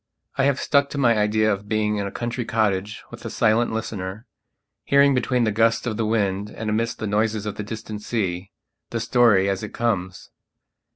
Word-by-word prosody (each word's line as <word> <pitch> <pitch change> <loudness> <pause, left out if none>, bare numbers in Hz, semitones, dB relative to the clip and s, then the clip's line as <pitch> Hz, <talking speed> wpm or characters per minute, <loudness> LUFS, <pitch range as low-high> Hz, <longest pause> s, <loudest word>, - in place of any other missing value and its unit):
I 135 - +2
have 140 -1 +2
stuck 140 -1 +2
to - - -6
my 120 -4 +4
idea 110 0 +2
of 100 +1 -7
being 105 -1 +1
in 100 -1 -2
a - - -6
country 120 +1 -3
cottage 105 -3 -1
with - - -10
a - - -4
silent 115 +2 +2
listener, 110 -1 -5 0.6
hearing 140 0 +4
between 125 -1 +1
the 110 - +2
gusts 115 +3 +2
of 115 -3 -2
the 110 0 -1
wind 100 -2 0
and 110 0 -4
amidst 115 +2 -1
the 110 - -4
noises 105 0 0
of 105 - -3
the - - -6
distant 110 0 -6
sea, 95 -5 -2 0.4
the 115 - -2
story 115 -4 +4
as 95 -1 -1
it 105 - -7
comes. 95 -6 -2
110 Hz, 195 wpm, -23 LUFS, 105-115 Hz, 0.6 s, my